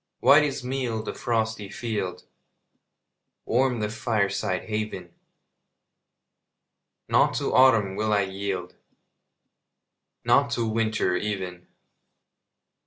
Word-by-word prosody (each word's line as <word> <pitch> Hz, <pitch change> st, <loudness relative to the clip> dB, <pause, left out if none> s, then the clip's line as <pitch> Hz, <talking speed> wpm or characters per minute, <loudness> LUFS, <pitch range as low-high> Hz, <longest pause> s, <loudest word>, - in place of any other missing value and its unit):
White 145 Hz, +2 st, +7 dB
as 140 Hz, -3 st, -2 dB
meal 125 Hz, -4 st, -2 dB
the -, -, -5 dB
frosty 110 Hz, -3 st, -2 dB
field 105 Hz, -5 st, -4 dB, 1.2 s
Warm 125 Hz, -1 st, +1 dB
the 105 Hz, -, -1 dB
fireside 105 Hz, -4 st, -1 dB
haven 105 Hz, -5 st, -4 dB, 1.9 s
Not -, -, +3 dB
to -, -, -1 dB
autumn 115 Hz, -7 st, +5 dB
will 110 Hz, +1 st, -1 dB
I 105 Hz, -1 st, +3 dB
yield, 95 Hz, -2 st, -4 dB, 1.5 s
Not -, -, +4 dB
to 115 Hz, -1 st, -1 dB
winter 110 Hz, -4 st, 0 dB
even! 95 Hz, -4 st, -4 dB
110 Hz, 95 wpm, -25 LUFS, 95-115 Hz, 1.9 s, White